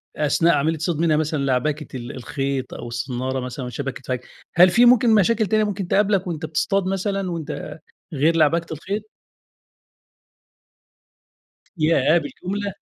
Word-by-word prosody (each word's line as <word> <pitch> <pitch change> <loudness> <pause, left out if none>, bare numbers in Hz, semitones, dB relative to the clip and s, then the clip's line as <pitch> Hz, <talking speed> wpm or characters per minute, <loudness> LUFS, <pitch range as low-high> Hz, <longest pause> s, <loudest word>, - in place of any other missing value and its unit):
أثناء 155 +2 +2
عملية 155 +3 +1
الصيد، 165 +1 -2
منها 160 -2 +3
مثلًا 155 -2 -1
لعبكة 145 +2 -1
ال 120 -1 -7
الخيط 135 +1 -3
أو - - -7
الصنّارة 125 +2 -3
مثلًا 125 +1 -5
والشبك 135 +2 -5
اتفك. 125 -1 -4 0.3
هل 180 +1 +7
في 240 +7 +5
ممكن 240 -2 +5
مشاكل 215 +2 +3
تانية 215 +2 +2
ممكن 200 -3 -3
تقابلك 195 -1 +2
وأنت 160 -2 -4
بتصطاد 190 +5 0
مثلًا 195 -1 -2
وأنت 160 -1 -6 0.3
غير 155 +4 +2
لعبكة 165 +1 +2
الخيط؟ 205 +7 -5 2.7
ياه! 160 +1 +3
بالجملة؟ 195 +6 -4
160 Hz, 135 wpm, -22 LUFS, 140-195 Hz, 2.7 s, هل